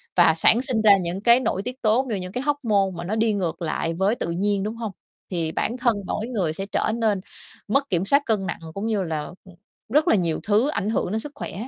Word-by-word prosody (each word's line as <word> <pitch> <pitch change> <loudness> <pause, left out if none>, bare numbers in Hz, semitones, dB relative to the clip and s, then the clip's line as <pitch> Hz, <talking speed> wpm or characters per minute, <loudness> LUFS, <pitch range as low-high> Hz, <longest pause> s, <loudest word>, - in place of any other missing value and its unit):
và 175 -2 +6
sản 230 +8 +5
sinh 250 -4 -1
ra 205 -2 +7
những 180 +3 -4
cái 235 +2 +6
nội 195 -6 -1
tiết 250 +2 -7
tố, 225 +4 +3
rồi 210 -4 -1
những 180 0 -6
cái 250 - -3
hormone 230 -9 +1
mà 170 - -5
nó 200 +5 -2
đi 220 0 +2
ngược 185 -4 -2
lại 165 0 -2
với 190 +6 +1
tự 170 - -4
nhiên, 195 +3 0
đúng 215 +2 -3
hông? 225 -2 -4 0.4
Thì 165 -3 -1
bản 235 +8 -2
thân 240 -3 +2
mỗi 220 - -2
người 190 -11 -1
sẽ 195 - -5
trở 200 - -1
nên 215 -5 +1 0.5
mất 275 +6 +1
kiểm 180 -1 0
soát 280 +8 +4
cân 210 -4 0
nặng, 175 - -4
cũng 200 +4 -4
như 210 -4 0
là, 160 -2 -2 0.3
ừm, 185 -2 -15 0.3
rất 300 +6 +3
là - - +5
nhiều 170 -5 0
thứ 215 +6 +3
ảnh 215 -8 -1
hưởng 215 -4 -1
đến 220 - 0
sức 290 +6 -8
khỏe. - - -6
210 Hz, 250 wpm, -23 LUFS, 185-235 Hz, 0.5 s, ra